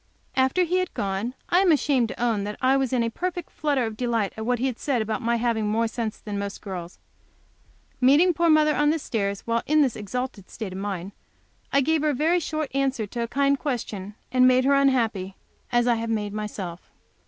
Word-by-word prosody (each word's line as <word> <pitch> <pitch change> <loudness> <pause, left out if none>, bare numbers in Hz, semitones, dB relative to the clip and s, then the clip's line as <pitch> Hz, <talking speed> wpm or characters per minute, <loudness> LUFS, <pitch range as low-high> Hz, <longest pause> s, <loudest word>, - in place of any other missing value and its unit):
After 265 +7 +3
he 355 +1 +1
had 365 - -3
gone, 200 +5 -2
I 355 - +4
am 380 -2 +4
ashamed 275 -5 +2
to - - -8
own 230 -4 +1
that 210 +1 -5
I 260 +1 +3
was 270 -2 0
in 250 -2 +2
a 230 - -1
perfect 355 +3 -4
flutter 285 -5 0
of 220 -1 -4
delight 230 -3 -1
at 220 +1 -5
what 245 0 +2
he 245 - -1
had 255 -3 -2
said 270 -5 0
about 220 -1 -2
my 235 +1 +1
having 230 -2 0
more 225 +2 +1
sense 225 -1 -4
than 205 -2 -5
most 200 0 -4
girls. 180 -3 -7 1.0
Meeting 295 +8 +5
poor 340 +1 +2
mother 305 -1 +4
on 295 0 +3
the 320 - +2
stairs 200 -8 -2
while 230 0 0
in 305 0 +4
this 260 -5 0
exalted 220 -1 -5
state 210 -5 -6
of 190 - -6
mind, 195 -2 -4 0.6
I 280 - +4
gave 315 +2 +2
her 305 - +2
a 290 - 0
very 325 +6 +2
short 310 -2 -3
answer 270 -4 0
to 235 +4 -5
a 235 - -1
kind 275 +2 +1
question, 210 -7 -4 0.2
and 255 0 +5
made 255 0 +4
her 280 - +4
unhappy, 230 -9 +1 0.4
as 240 -1 +3
I 245 - +4
have 230 0 -3
made 210 -2 -1
myself. 200 -5 -5
240 Hz, 220 wpm, -25 LUFS, 215-280 Hz, 1.0 s, Meeting